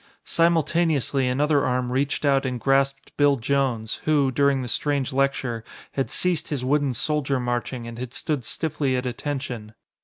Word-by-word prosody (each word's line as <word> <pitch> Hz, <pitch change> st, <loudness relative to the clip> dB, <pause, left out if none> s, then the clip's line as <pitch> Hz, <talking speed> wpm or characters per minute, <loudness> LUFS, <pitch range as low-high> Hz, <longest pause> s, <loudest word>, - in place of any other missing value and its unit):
Simultaneously 160 Hz, -5 st, +2 dB
another 145 Hz, +3 st, +2 dB
arm 125 Hz, 0 st, 0 dB
reached 140 Hz, +3 st, 0 dB
out 135 Hz, -1 st, +3 dB
and 130 Hz, -2 st, -2 dB
grasped 135 Hz, +1 st, +1 dB
Bill 145 Hz, -1 st, +5 dB
Jones, 120 Hz, -3 st, -1 dB
who, 145 Hz, -4 st, +3 dB
during 140 Hz, 0 st, +2 dB
the -, -, -4 dB
strange 140 Hz, +1 st, -1 dB
lecture, 130 Hz, -4 st, 0 dB, 0.3 s
had 135 Hz, -, -1 dB
ceased 180 Hz, -3 st, -1 dB
his 135 Hz, -4 st, -2 dB
wooden 140 Hz, -1 st, +1 dB
soldier 140 Hz, 0 st, 0 dB
marching 120 Hz, 0 st, -2 dB
and 115 Hz, 0 st, -8 dB
had 125 Hz, -1 st, -5 dB
stood 150 Hz, -5 st, -2 dB
stiffly 140 Hz, 0 st, -1 dB
at 125 Hz, 0 st, -2 dB
attention. 125 Hz, -4 st, -4 dB
135 Hz, 155 wpm, -24 LUFS, 125-145 Hz, 0.3 s, Bill